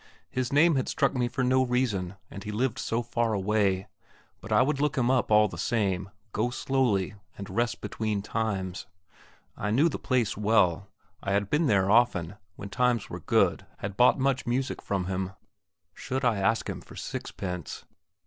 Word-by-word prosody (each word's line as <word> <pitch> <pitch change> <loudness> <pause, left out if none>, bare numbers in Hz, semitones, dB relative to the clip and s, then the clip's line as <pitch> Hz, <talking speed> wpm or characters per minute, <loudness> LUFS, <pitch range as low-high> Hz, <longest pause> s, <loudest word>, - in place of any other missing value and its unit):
His 125 -1 -2
name 150 +2 +5
had 130 - -1
struck - - +1
me 125 -2 0
for 130 +2 -2
no 130 +1 +3
reason, 115 -8 0 0.2
and 100 - -8
he 105 - -5
lived 125 +3 -1
so 115 -1 -1
far 120 -1 0
away; 100 -1 +1 0.5
but - - -10
I - - +5
would 140 +1 0
look 150 -2 0
him 125 -1 +3
up 130 -2 +1
all 105 0 +6
the - - -8
same, 100 -5 0 0.2
go 115 +4 0
slowly, 125 -8 0 0.2
and 100 -1 -7
rest 115 +4 -1
between 105 -3 -2
times. 100 -5 -3 0.7
I 105 - -3
knew 140 +10 +4
the - - -5
place 125 -5 0
well; 100 -3 +2 0.3
I 100 - -1
had 100 0 0
been 150 +1 +3
there 100 -4 +3
often, 105 -6 +3 0.2
when 100 - -8
times 125 +1 +1
were - - -5
good - - +1
had 100 0 -5
bought 125 +4 +5
much 135 -1 0
music 130 +3 -1
from 95 -3 -2
him. 95 0 -3 0.6
Should 130 +7 -3
I 115 -4 +3
ask 110 +4 +1
him - - -5
for - - -14
sixpence? 90 -5 -5
110 Hz, 180 wpm, -28 LUFS, 100-125 Hz, 0.7 s, all